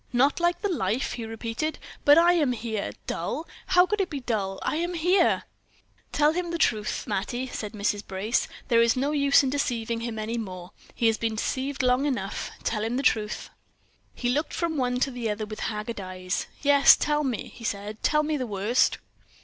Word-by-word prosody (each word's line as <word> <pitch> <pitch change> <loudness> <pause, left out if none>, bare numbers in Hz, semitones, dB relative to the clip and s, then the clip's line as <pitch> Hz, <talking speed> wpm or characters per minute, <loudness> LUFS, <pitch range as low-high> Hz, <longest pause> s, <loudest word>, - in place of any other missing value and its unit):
"Not 270 +6 +3
like 345 0 +1
the - - +2
life!" 245 - -1
he 230 - -5
repeated. 230 +7 -3 0.3
"But 290 +1 +8
I 345 +1 +6
am 295 -7 +2
here! 220 -3 -3 0.2
Dull! 325 - -3 0.2
How 360 -1 +6
could 420 +2 0
it 375 - -1
be 290 - -4
dull? 205 -6 -2
I - - 0
am 345 +2 -2
here!" 350 +2 +3 0.7
"Tell 300 0 +4
him 350 0 -2
the 340 - -2
truth, 215 -9 0
Mattie," 240 +6 -2
said 220 -4 -6
Mrs. 205 0 -1
Brace; 200 +5 0 0.2
"there 230 -1 +4
is 230 -1 +4
no 275 +3 0
use 280 -1 +4
in 265 - 0
deceiving 235 -5 -1
him 230 -1 -4
any 225 +2 -2
more; 185 -4 -7 0.2
he 235 - -1
has 225 -1 +3
been 225 -1 -1
deceived 265 +5 -2
long 250 +3 +3
enough; 210 -8 -3
tell 215 -2 -1
him 230 +3 -1
the 275 - -1
truth." 215 -5 0 0.6
He 245 - -1
looked 295 +5 -1
from 335 -2 -1
one 250 -3 0
to 270 - +2
the 240 -3 -3
other 210 +1 -2
with 215 0 -8
haggard 210 0 -3
eyes. 185 0 -3 0.2
"Yes, 285 -1 +7
tell 300 0 +1
me," 255 -5 -2
he 235 - -12
said; 210 0 -4
"tell 300 0 +3
me 305 0 0
the 255 -3 -3
worst." 210 +4 +2
245 Hz, 200 wpm, -26 LUFS, 215-295 Hz, 0.7 s, But